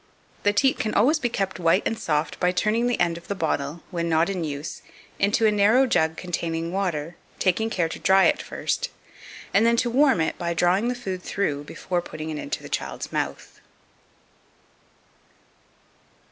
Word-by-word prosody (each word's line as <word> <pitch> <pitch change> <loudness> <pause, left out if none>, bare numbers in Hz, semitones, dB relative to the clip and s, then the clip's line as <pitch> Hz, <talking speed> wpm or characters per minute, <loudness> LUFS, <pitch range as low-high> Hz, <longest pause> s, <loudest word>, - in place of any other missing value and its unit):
The 205 - +3
teat 265 +6 +2
can 215 - -1
always 280 +10 +4
be 245 - 0
kept 195 -4 -2
white 170 +3 +3
and - - 0
soft 150 -7 -1
by 180 - +2
turning 220 +5 +1
the 245 - 0
end 170 -1 +1
of 170 - -20
the 200 - -2
bottle, 155 -2 -2
when 170 -2 -2
not 165 +3 +2
in 185 -3 -3
use, 145 0 -5 0.4
into 205 +3 +2
a 215 - +5
narrow 210 +6 +4
jug 160 -10 +1
containing 165 -2 -3
water, 175 -4 -2 0.2
taking 210 +4 +1
care 175 -6 0
to 160 - -7
dry 190 0 +5
it - - +3
first, - - -2 0.6
and 200 +3 +5
then 235 0 +4
to 240 0 +1
warm 270 - +4
it 160 - -1
by 170 -1 -2
drawing 180 +6 +2
the 250 - 0
food 190 -7 -5
through 145 -8 -2
before 175 +3 -3
putting 155 -2 -6
it 150 - -4
into - - -4
the - - -7
child's 60 -2 -4
mouth. - - -4
185 Hz, 180 wpm, -24 LUFS, 165-220 Hz, 0.6 s, a